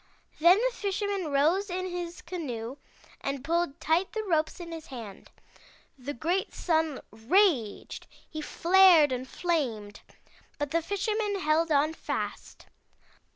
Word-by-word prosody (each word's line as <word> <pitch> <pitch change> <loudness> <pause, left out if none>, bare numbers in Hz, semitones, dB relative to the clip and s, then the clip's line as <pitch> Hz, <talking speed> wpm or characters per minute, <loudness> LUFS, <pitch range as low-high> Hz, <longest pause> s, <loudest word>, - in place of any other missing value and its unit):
Then 345 +4 +7
the - - 0
Fisherman 400 -2 -2
rose 330 +9 +2
in 370 +1 -2
his 350 -1 -5
canoe, 260 -8 -5 0.5
and 275 -2 -3
pulled 335 -1 -1
tight 330 +5 +1
the 440 0 -2
ropes 320 -4 0
in 340 -1 -8
his 325 -2 -8
hand. 230 -7 -9 0.7
The 280 +1 -6
great 345 +10 -1
Sun 320 -4 0
raged! 240 - +1 0.2
He 310 - -6
flared 345 -2 +5
and 255 0 -3
flamed, 235 - -2 0.6
but 290 -1 -3
the 335 - +2
Fisherman 405 +3 -1
held 315 +1 +2
on 300 +2 +3
fast. - - -5
325 Hz, 130 wpm, -28 LUFS, 280-370 Hz, 0.7 s, Then